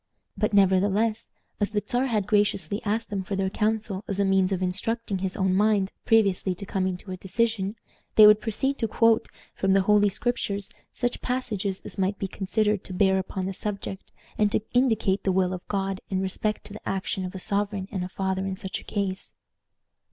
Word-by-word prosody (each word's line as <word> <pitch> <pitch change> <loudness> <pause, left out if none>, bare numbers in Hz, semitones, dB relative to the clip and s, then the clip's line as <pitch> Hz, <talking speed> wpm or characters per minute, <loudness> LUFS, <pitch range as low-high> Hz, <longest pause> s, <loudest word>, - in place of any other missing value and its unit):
But 215 - 0
nevertheless, 200 +3 +2 0.3
as 205 - +1
the 210 -1 -1
Czar 250 +2 +1
had 215 -5 0
graciously 205 -2 +1
asked 220 +2 -1
them 195 -2 -2
for 195 - -3
their 190 0 0
counsel 210 -2 -1
as 200 -1 -3
a 200 - +3
means 195 -1 +3
of 190 - 0
instructing 205 +2 -2
his 190 +2 -2
own 190 -2 +2
mind 200 -1 +2
previously 195 -4 +3
to 200 - -8
coming 190 -2 -1
to 185 +1 -9
a 185 - -4
decision, 205 +1 -1 0.4
they 215 - +9
would 210 0 +7
proceed 265 +5 -1
to 225 - +1
quote 225 +1 +3 0.3
from 195 0 +1
the 195 -1 +4
Holy 205 +1 +4
Scriptures 200 -3 -2 0.2
such 245 0 -2
passages 215 -7 -2
as - - -6
might 195 +1 +1
be 195 - -3
considered 210 +1 0
to 185 - -7
bear 190 0 +3
upon 190 0 -4
the 195 - -3
subject, 195 -1 -5 0.3
and 210 -1 +3
to - - +1
indicate 225 -6 +2
the 190 - +2
will 185 0 +1
of 180 - -7
God 195 -1 -2
in 190 - 0
respect 195 +3 -2
to 205 - -9
the 215 - -7
action 190 0 -2
of 185 +1 -6
a - - -3
sovereign 200 0 -1
and 180 -1 -3
father 190 0 -1
in 190 - -2
such 190 0 -5
a - - -14
case. 195 -2 -3
200 Hz, 200 wpm, -26 LUFS, 190-215 Hz, 0.4 s, they